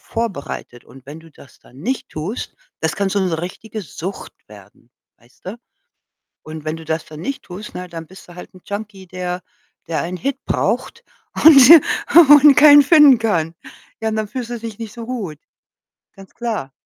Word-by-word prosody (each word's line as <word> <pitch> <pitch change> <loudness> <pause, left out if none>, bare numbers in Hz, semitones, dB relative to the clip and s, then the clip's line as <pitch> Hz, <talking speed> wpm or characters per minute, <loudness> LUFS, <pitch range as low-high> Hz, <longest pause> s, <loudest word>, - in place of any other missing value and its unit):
vorbereitet. 160 - -6
Und 130 -1 -17
wenn 145 +3 -10
du 165 0 -18
das 140 - -19
dann 125 - -21
nicht 260 - -4
tust, 175 +10 -6 0.3
das 160 - -1
kann 200 0 -1
so 200 - -1
'ne 180 -5 -1
richtige 215 +4 -7
Sucht 185 +3 -8
werden, 105 +3 -18 0.3
weißt 120 +2 -28
du? 205 +6 -7 0.8
Und 155 0 -10
wenn 155 +1 -4
du 165 - -12
das 160 0 -3
dann 155 0 -11
nicht 275 +8 -5
tust, 190 +4 -10
na 180 - -6
ja, 180 - -10
dann 165 -1 -9
bist 190 - -15
du 175 - -14
halt 180 - -12
'n 185 - -16
Junkie, 200 -2 -8
der 180 0 -5 0.5
der 165 - -3
einen 175 +2 -5
Hit 275 +8 -4
braucht 465 +1 -2 0.4
und 305 -3 +9 0.7
und 295 -1 +8
keinen 290 -1 +8
finden 285 -4 +6
kann. 170 -8 -1 0.5
Ja, 220 - -2
und 220 - -3
dann 215 -1 -3
fühlst 245 +1 -6
du 240 - -5
dich 225 -2 -9
nicht 225 -2 -8
so 235 -1 -8
gut, 205 - -6 0.8
ganz 195 -1 -16
klar. 220 - -5
190 Hz, 190 wpm, -18 LUFS, 160-230 Hz, 0.8 s, und